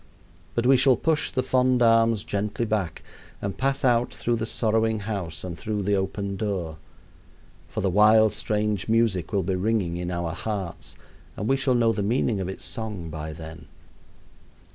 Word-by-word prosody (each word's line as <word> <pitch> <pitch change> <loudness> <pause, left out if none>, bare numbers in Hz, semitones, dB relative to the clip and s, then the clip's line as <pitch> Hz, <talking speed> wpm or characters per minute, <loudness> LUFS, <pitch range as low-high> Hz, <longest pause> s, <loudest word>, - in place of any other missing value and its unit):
But 120 - 0
we 135 +1 +6
shall 130 0 +5
push 160 +2 +1
the 130 - -1
fond 125 -1 +3
arms 115 -2 +4
gently 105 +3 -2
back 100 -7 -2 0.4
and 100 -1 -4
pass 135 +1 0
out 120 -1 +3
through 115 +3 -1
the 110 0 -2
sorrowing 110 -1 +1
house 95 -6 -4
and 90 -2 -5
through 105 +5 -3
the 100 +2 +1
open 100 +1 -2
door. 90 -7 -3 0.9
For - - -4
the 95 - +1
wild, 110 +2 +5
strange 105 -1 -1
music 110 -7 +1
will 100 -3 +1
be 95 +2 -1
ringing 95 -2 0
in 90 0 -3
our 85 -1 -2
hearts, 95 -2 -4 0.4
and 105 - -3
we 135 - +3
shall 135 -1 +1
know 115 -1 +3
the 105 - -2
meaning 110 0 +1
of 95 -1 -3
its 95 - -6
song 105 -8 -5
by 80 0 -5
then. 80 0 -10
105 Hz, 175 wpm, -25 LUFS, 95-115 Hz, 0.9 s, we